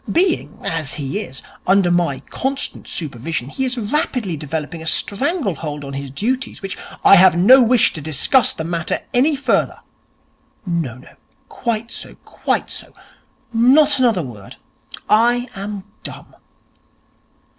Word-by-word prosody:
Being, 340 - +1
as 160 -5 -1
he 140 -2 -3
is, 130 +1 -7 0.2
under 190 -1 +4
my 170 -6 +1
constant 270 +1 -3
supervision 140 -2 -4
he 265 - -2
is 255 -1 -2
rapidly 225 - -1
developing 155 +2 -5
a 160 - -7
stranglehold 195 - 0
on 140 0 -7
his 140 0 -5
duties, 245 - -2
which 195 - -4 0.2
' - - -16
'I 195 - +9
have 180 -1 +6
no 255 +10 +7
wish 240 -1 +3
to 155 - -6
discuss 155 - +3
the 160 - -5
matter 165 0 -2
any 280 +5 +3
further.' 280 - 0 0.8
'No, 165 - -2
no. 125 - -16 0.4
Quite 230 -1 -3
so, - - -7
quite - - -2
so. - - -6 0.6
Not 275 +5 +5
another 230 -9 +2
word. 105 -7 -10 0.5
I 240 +3 +3
am 200 0 -5 0.2
dumb.' - - -9
190 Hz, 140 wpm, -19 LUFS, 155-245 Hz, 0.8 s, I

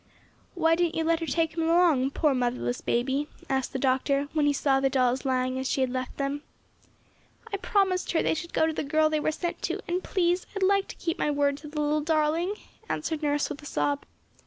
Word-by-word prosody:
"Why 325 -2 +3
didn't 345 0 +1
you 325 - 0
let 330 0 +2
her 330 - -4
take 325 -1 +1
them 330 -1 -1
along, 325 -6 +4
poor 290 +1 +1
motherless 240 - -1
baby?" 265 +5 0 0.2
asked 265 -1 -1
the - - -3
doctor 275 +2 +1
when 300 -2 +2
he - - +4
saw 275 -1 +2
the 270 0 +2
dolls 255 0 +1
lying 255 0 0
as 265 - -2
she 270 - 0
had 260 -1 +1
left 255 0 -4
them. 280 +1 -2 1.1
"I - - +1
promised 385 -2 +1
her 325 - +2
they - - +2
should 320 +2 -5
go - - +2
to 320 - 0
the - - -2
girl 310 +2 +2
they 310 - +1
were 305 - 0
sent 345 +2 -4
to, - - -2
and 360 +1 -1
please, 355 -1 0
I'd 395 - -1
like 395 +1 +3
to - - -8
keep 335 +1 -3
my - - +1
word 285 -1 +1
to 300 - -10
the 300 +1 -5
little 300 +1 +1
darling," 320 +5 +1 0.3
answered 320 -2 -2
Nurse 290 -1 +1
with 295 -1 -7
a 295 - -9
sob. 285 0 -1
300 Hz, 230 wpm, -27 LUFS, 270-330 Hz, 1.1 s, along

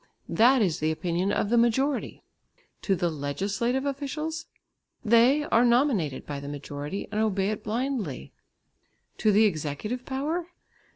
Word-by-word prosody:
That 245 +1 +5
is 175 -6 0
the 155 - +1
opinion 175 +4 -1
of 205 +1 0
the 240 - +5
majority. 265 +5 0 0.6
To 195 - +1
the 175 -1 0
legislative 200 - -2
officials? 300 +3 -4 0.6
They 235 +6 +5
are 245 -6 +3
nominated 235 - +2
by 145 -1 -5
the 140 0 -7
majority 145 +5 -5
and 215 0 0
obey 200 -2 +1
it 215 - -5
blindly. 220 - -3 0.9
To 215 - +3
the 210 +2 +5
executive 195 - -2
power? 305 +7 -2
215 Hz, 135 wpm, -27 LUFS, 170-265 Hz, 0.9 s, That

